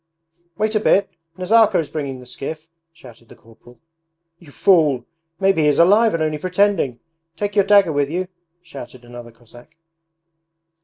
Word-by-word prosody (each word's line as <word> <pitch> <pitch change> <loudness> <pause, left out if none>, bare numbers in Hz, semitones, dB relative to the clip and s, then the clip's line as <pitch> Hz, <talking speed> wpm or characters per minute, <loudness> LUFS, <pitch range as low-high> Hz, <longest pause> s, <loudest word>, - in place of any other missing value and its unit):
'Wait 215 +1 -1
a 215 - +1
bit, 200 -1 +1 0.3
Nazarka 215 +4 +3
is 150 -4 -3
bringing 140 -4 -5
the 125 - -13
skiff,' 155 +5 -8 0.3
shouted 120 -7 -17
the - - -15
corporal. 120 +2 -20 0.6
'You 170 - -17
fool! 150 -6 +2 0.3
Maybe 195 -4 +2
he 150 - +2
is 145 - +2
alive 205 +5 +4
and 160 - -1
only 155 -1 -2
pretending! 180 -8 0 0.4
Take 205 0 -4
your 200 -2 +3
dagger 200 -5 +4
with 145 -1 0
you!' 180 +3 -3 0.4
shouted 130 -6 -12
another 120 0 -11
Cossack. 120 +4 -19
155 Hz, 155 wpm, -19 LUFS, 130-195 Hz, 0.6 s, alive